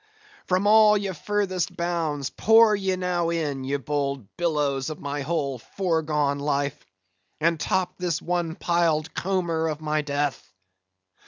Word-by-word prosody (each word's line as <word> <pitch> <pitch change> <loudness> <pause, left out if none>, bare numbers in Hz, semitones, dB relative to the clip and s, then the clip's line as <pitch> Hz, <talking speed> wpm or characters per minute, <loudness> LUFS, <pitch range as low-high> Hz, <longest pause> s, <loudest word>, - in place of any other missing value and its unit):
from 185 +2 +1
all 210 0 +6
your 200 -2 -3
furthest 185 -1 -2
bounds, 165 -5 -2
pour 225 -1 +5
ye 190 -2 -1
now 180 -2 -1
in, 150 -5 -2
ye 140 +2 -1
bold 140 -5 -3
billows 150 -5 0
of 155 - -6
my 145 0 -4
whole 140 -3 -2
foregone 150 -3 -1
life, 140 0 -1 0.6
and 165 +1 +1
top 185 +4 -1
this 175 -3 -1
one 175 -2 -2
piled 165 -3 +1
comber 170 -4 -1
of 155 -2 -3
my 155 0 0
death! 145 - -2
160 Hz, 140 wpm, -25 LUFS, 145-180 Hz, 0.6 s, all